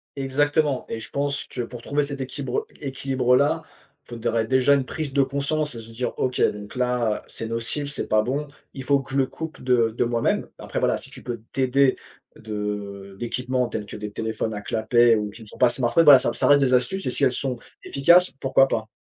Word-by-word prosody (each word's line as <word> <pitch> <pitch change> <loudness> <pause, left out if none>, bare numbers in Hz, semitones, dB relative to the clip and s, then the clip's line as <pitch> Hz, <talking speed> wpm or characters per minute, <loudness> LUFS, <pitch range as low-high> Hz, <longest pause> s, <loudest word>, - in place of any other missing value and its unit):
Exactement, 145 +1 +1
et 115 - -4
je 110 - -9
pense 140 0 -1
que 125 - -6
pour 120 0 -7
trouver 145 +1 0
cet 140 -1 -4
équibre 130 -1 -3 0.2
équilibre-là, 135 +2 +1 0.4
faudrait 115 -1 -1
déjà 130 +3 +4
une 135 -2 +2
prise 155 +1 -4
de 140 - +4
conscience 140 +1 -1
et 115 - -7
se 115 - -13
dire: 120 +1 -3
«OK, 130 -1 -1
donc 105 +2 -1
là, 125 -3 0
c'est 115 - -7
nocif, 115 +6 -3
c'est 145 - -4
pas 110 0 +3
bon, 140 +5 -2 0.3
il 135 - -7
faut 140 +1 +3
que 135 - -10
je 140 - 0
le 135 - +2
coupe 160 +4 -8
de 120 -3 +2
de - - +2
moi-même». 120 -1 0
Après - - -4
voilà, - - +2
si - - -11
tu - - -11
peux 120 -3 -5
t'aider 135 0 +2 0.4
de 105 -2 -5
d'équipements 125 +1 -1
tels 110 -2 -4
que - - -9
des 105 0 -6
téléphones 110 +1 -3
à 105 - -5
clapet 115 +2 +3
ou 105 -1 -2
qui 110 +3 -12
ne - - -14
sont - - -12
pas 125 - +6
smartphones, 130 +7 +2
voilà, 140 -3 +10
ça - - -1
ça - - 0
reste 145 0 +6
des 130 -2 +2
astuces 130 +11 +1
et 125 - 0
si 140 - -2
elles 130 - +5
sont 130 -1 -2 0.3
efficaces, 170 +6 +4
pourquoi 135 0 +4
pas? 110 -4 -2
125 Hz, 220 wpm, -24 LUFS, 115-140 Hz, 0.4 s, voilà